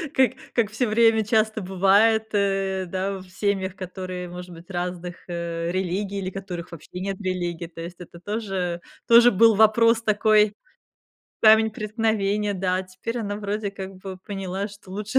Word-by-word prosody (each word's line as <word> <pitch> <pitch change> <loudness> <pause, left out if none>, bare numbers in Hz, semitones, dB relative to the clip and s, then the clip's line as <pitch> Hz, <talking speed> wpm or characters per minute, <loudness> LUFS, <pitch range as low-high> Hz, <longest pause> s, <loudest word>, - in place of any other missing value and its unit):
как 260 -1 +4 0.2
как 220 -3 +2
всё 240 +2 0
время 220 0 +4
часто 220 0 +1
бывает, 200 +4 +3
э, 195 -2 0
да, 190 +2 -2
в 185 - -13
семьях, 190 -1 -1
которые, 185 -1 -6
может 180 0 -8
быть, 170 +3 -13
разных, 180 0 -4
э, 170 -1 -3
религий, 190 +2 -2
или 185 - -3
которых 185 -3 -7
вообще 170 +2 -9
нет 195 +1 -4
религии. 175 -2 -3
То 165 0 -10
есть, 170 +1 -8
это 170 -1 -11
тоже 190 -4 -3 0.3
тоже 235 +1 +8
был 225 +2 +5
вопрос 230 +2 +5
такой, 215 -1 +3 0.9
камень 220 0 +6
преткновения. 210 -1 -1
Да, 185 0 0
теперь 185 +6 -6
она 205 -3 -3
вроде, 205 0 -3
как 195 -1 -8
бы 190 0 -8
поняла, 195 0 -4
что 200 -2 -15
лучше 210 +5 0
195 Hz, 160 wpm, -24 LUFS, 185-215 Hz, 0.9 s, тоже